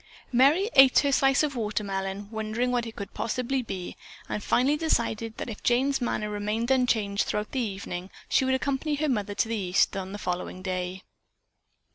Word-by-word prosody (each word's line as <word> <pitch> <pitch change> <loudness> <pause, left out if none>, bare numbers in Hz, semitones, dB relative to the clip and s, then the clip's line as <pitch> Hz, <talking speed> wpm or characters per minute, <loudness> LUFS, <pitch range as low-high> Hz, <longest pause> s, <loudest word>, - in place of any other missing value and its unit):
Merry 295 - +4
ate 270 -2 +7
her 280 - +1
slice 270 +1 +4
of 290 -3 -1 0.2
melon, 195 0 -4
wondering 220 +3 -1
what 240 -1 0
it 225 - -9
could 200 - -7
possibly 250 +4 -1
be, 190 -6 -6 0.3
and 210 - -4
finally 270 +4 +3
decided 230 -8 -1
that - - -5
if 220 -3 -7
Jane's 265 +3 +2
manner 215 -3 -1
remained 210 +4 -2
unchanged 220 -6 +2
throughout 210 0 -2
the 265 - -1
evening, 190 -5 -4 0.2
she - - +3
would 260 0 +2
accompany 280 +3 -1
her 305 +1 -1
mother 210 -5 -1
to 210 - +1
the 230 - -2
East 190 -2 +1
on 190 -1 -4
the 205 - -5
following 180 -1 -4
day. 185 0 -3
225 Hz, 180 wpm, -27 LUFS, 200-265 Hz, 0.3 s, ate